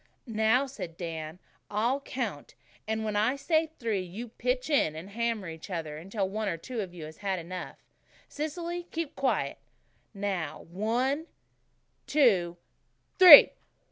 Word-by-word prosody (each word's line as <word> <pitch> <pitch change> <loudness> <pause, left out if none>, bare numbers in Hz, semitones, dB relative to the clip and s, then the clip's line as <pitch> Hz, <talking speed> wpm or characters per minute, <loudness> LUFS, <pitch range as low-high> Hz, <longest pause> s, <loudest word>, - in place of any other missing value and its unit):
"Now," 225 +3 +2
said 185 -11 -8
Dan, 160 -2 -6 0.3
"I'll 235 +6 0
count, 235 - -5 0.3
and 220 0 -2
when 215 -1 -2
I 220 +6 +2
say 315 +3 +1
three 220 -5 -1
you 200 +7 -7
pitch 250 +2 -2
in, 275 - +2
and 175 +6 -9
hammer 230 -3 -2
each 160 +3 -9
other 160 -4 -4
until 195 +4 -3
one 215 +2 -3
of 195 +2 -4
you 165 - -8
has 155 0 -11
had 195 -2 -2
enough. 180 +1 -7 0.5
Cecily, 340 +3 -5
keep 330 -3 -4
quiet. 270 - -1 0.6
Now, 195 -6 -3
one 250 - -1 0.8
two 190 - +3 0.6
three!" 355 -6 +11
215 Hz, 135 wpm, -29 LUFS, 180-260 Hz, 0.8 s, three